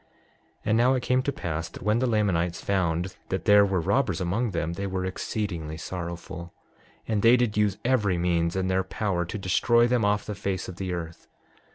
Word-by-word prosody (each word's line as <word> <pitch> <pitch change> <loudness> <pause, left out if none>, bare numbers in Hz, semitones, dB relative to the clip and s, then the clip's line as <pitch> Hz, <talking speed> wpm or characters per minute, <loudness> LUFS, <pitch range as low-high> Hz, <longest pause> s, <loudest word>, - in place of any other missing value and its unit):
6:20 - - -37 0.6
And 110 +1 +3
now 125 +2 +4
it 125 - -2
came 125 0 +2
to 140 - -1
pass 85 - -4
that - - -11
when 105 +2 +2
the 130 - +1
Lamanites 95 -7 +1
found 90 -1 -1
that 95 - -2
there 105 -1 +7
were 95 -2 +1
robbers 80 - +1
among 100 +7 0
them 85 -3 -2
they 100 +3 -3
were 95 -1 -2
exceedingly 90 -5 -3
sorrowful; 85 0 -6 0.5
and 110 -2 0
they 115 +3 +6
did 120 -4 0
use 105 -2 +2
every 105 -8 +2
means 85 -1 +1
in 95 -1 0
their 95 0 +2
power 95 -2 -2
to 90 - -5
destroy 115 +5 +3
them 120 -1 +2
off 105 0 +1
the 105 - -4
face 100 -1 -3
of 90 - -8
the 95 -1 -3
earth. 85 -1 -6
95 Hz, 205 wpm, -26 LUFS, 85-105 Hz, 0.6 s, there